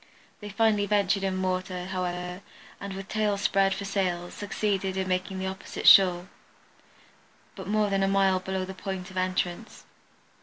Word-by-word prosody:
They 210 - -8
finally 210 -1 +2
ventured 200 -1 +2
in 190 -1 0
the - - +1
water, 185 -1 -3
however, 180 0 -4 0.4
and 200 -1 -6
with 195 0 -7
tails 210 -2 0
spread 195 -1 +2
for 200 - -5
sails, 180 -3 -2
succeeded 200 -2 -2
in 190 0 -1
making 185 +1 -2
the 190 - -3
opposite 190 0 -4
shore, 180 -2 +7 1.3
but 190 -2 -8
more 210 0 +1
than 195 0 +1
a 195 - +2
mile 195 -1 +3
below 190 0 -3
the 190 - -7
point 190 0 -6
of 185 - -9
entrance. 185 +2 -2
190 Hz, 165 wpm, -27 LUFS, 185-200 Hz, 1.3 s, shore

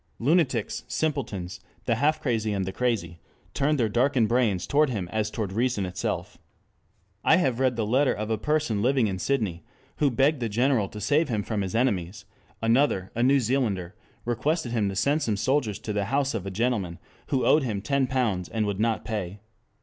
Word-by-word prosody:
Lunatics, 135 - +1
simpletons, 120 - -2 0.3
the 120 - +2
half 150 +7 +2
crazy 110 -5 -1
and 95 -2 -1
the 95 - -3
crazy 95 -9 -1 0.3
turned 145 +1 +1
their 115 - +3
darkened 120 +1 +2
brains 115 -7 +1
toward 150 0 +3
him 100 -8 -3
as 110 +1 -1
toward 105 -4 -4
reason 115 -2 0
itself. 90 0 -4 0.8
I - - +6
have 130 -9 +1
read 130 -2 +2
the 115 -2 -1
letter 130 +6 +3
of 105 +1 -3
a 110 - +1
person 150 -6 0
living 130 +1 +3
in 95 -3 -2
Sydney, 100 -10 -1 0.3
who 145 - +3
begged 135 +4 +2
the 115 -2 -2
General 120 -2 +1
to 105 - -8
save 145 - +2
him 110 -3 -1
from 105 -1 -2
his 95 0 -3
enemies; 100 -5 0 0.4
another, 115 -5 +2
a 120 - -2
New 135 +3 +4
Zealander, 110 -8 -1 0.3
requested 125 +3 -1
him 110 -4 +1
to 95 - -5
send 140 +10 +1
some 110 -7 0
soldiers 110 -2 0
to 105 - -5
the 100 -1 0
house 135 +4 0
of 100 -4 -4
a - - -1
gentleman 100 -4 -1 0.3
who 130 -2 0
owed 155 - +5
him 110 -7 -2
ten 140 +4 0
pounds 115 -9 -1
and 110 -1 -1
would 100 -1 -2
not 115 0 0
pay. 105 -3 -4
115 Hz, 195 wpm, -26 LUFS, 100-135 Hz, 0.8 s, I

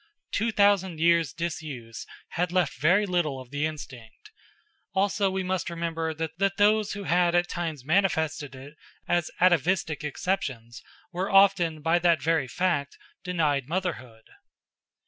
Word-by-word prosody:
Two 225 +2 0
thousand 200 -5 +2
years' 165 -3 +3
disuse 150 -8 -6 0.2
had 175 0 -1
left 180 -5 +1
very 180 +7 +4
little 175 -8 -1
of 130 -1 -12
the 145 +2 0
instinct; 130 - -10 0.6
also 195 +1 +2
we 190 0 -2
must 185 -1 -2
remember 165 -1 -3
that 165 +5 -2
those 210 0 +3
who 200 -1 -6
had 175 -1 +2
at 175 0 +2
times 160 -7 -4
manifested 160 -5 0
it 140 +3 -12 0.3
as 175 -2 +1
atavistic 175 -3 +2
exceptions 135 -8 -3 0.3
were 185 +2 -2
often, 185 -6 +4
by 165 +1 +3
that 170 -2 +3
very 160 -1 +1
fact, 150 -2 -1 0.3
denied 150 -7 0
motherhood. 130 -11 -4
170 Hz, 135 wpm, -26 LUFS, 150-185 Hz, 0.6 s, very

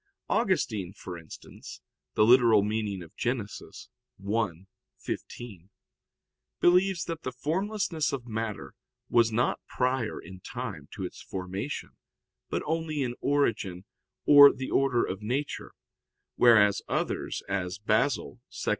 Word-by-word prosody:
Augustine 175 - 0
for 90 -2 -8
instance 80 -3 -11 0.4
(Gen. - - +6 1.2
ad 105 - -6
lit. - - -13 0.6
i, 110 -4 +2 0.5
15), 100 -7 -7 0.9
believes 180 0 +4
that 165 -1 -5
the 130 - -4
formlessness 170 - -1
of 130 -3 -4
matter 110 - -4 0.4
was 115 -1 +4
not 120 +2 +1
prior 125 -3 -1
in 95 +2 -11
time - - -6
to - - -5
its - - -8
formation, 95 +8 -5 0.6
but - - -2
only 160 -2 -1
in 120 -2 -2
origin 105 -10 0 0.4
or 145 -1 +10
the 130 - -6
order 130 -3 +2
of 95 +2 -5
nature, 130 +7 -3 0.6
whereas 105 -4 +5
others, - - -2
as 90 -2 -2
Basil 110 +6 0 0.3
(Hom. - - +1
120 Hz, 115 wpm, -28 LUFS, 100-145 Hz, 1.2 s, or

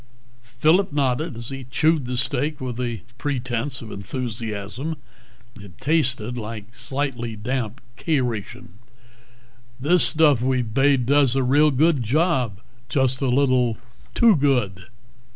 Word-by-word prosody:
Phillip 165 +8 +3
nodded 140 +1 0
as 115 0 -6
he 135 -1 -7
chewed 155 +3 +1
the 125 0 -3
steak 140 +4 -1
with 125 -2 -5
a 120 -6 -3 0.2
pretence 125 -2 -2
of 110 - -9
enthusiasm. 115 - -4 0.6
It 100 -3 -13
tasted 130 -5 0
like 110 0 -7
slightly 125 -4 -3
damp 120 +2 -3 0.2
K 155 -4 +1
ration. 115 -2 -5 1.0
"This 170 +7 +3
stuff 150 -6 +3
we've 125 -3 0
bade 135 -1 +3
does 140 -1 +4
a 135 - +2
real 145 +4 +4
good 150 +1 +2
job. 125 - 0 0.3
Just 130 -3 +1
a 135 - +1
little 125 -3 +2 0.4
too 230 -4 +6
good." 125 - 0
130 Hz, 130 wpm, -23 LUFS, 115-145 Hz, 1.0 s, too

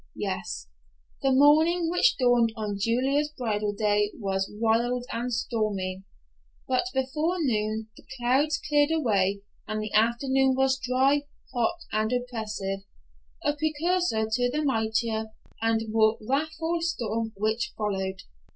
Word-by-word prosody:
Yes, - - -4 0.5
the 270 - +2
morning 315 +5 +5
which 355 +8 +3
dawned 245 -3 +3
on 210 -3 -3
Julia's 270 +7 +1
bridal 210 -4 -1
day 205 0 +1
was 195 -3 -1
wild 230 +3 +1
and 240 +2 -2
stormy, 210 -5 -2 0.7
but 255 +4 +1
before 300 +6 0
noon 220 -7 -1
the - - -16
clouds 270 +5 +2
cleared 295 0 +3
away 200 -11 +1 0.3
and 215 0 -2
the 215 -1 -5
afternoon 260 +4 +3
was 265 0 +2
dry, 270 +3 +2 0.3
hot 265 +8 0
and 215 +1 0
oppressive, 220 -6 -3 0.7
a 290 - +2
precursor 315 -5 0
to 245 +2 +2
the 300 +4 -1
mightier 220 -3 0 0.4
and 225 0 +1
more 220 0 +3
wrathful 315 +4 -1
storm 230 -9 -2
which 220 +3 0
followed. 190 -3 -2
240 Hz, 125 wpm, -27 LUFS, 215-285 Hz, 0.7 s, morning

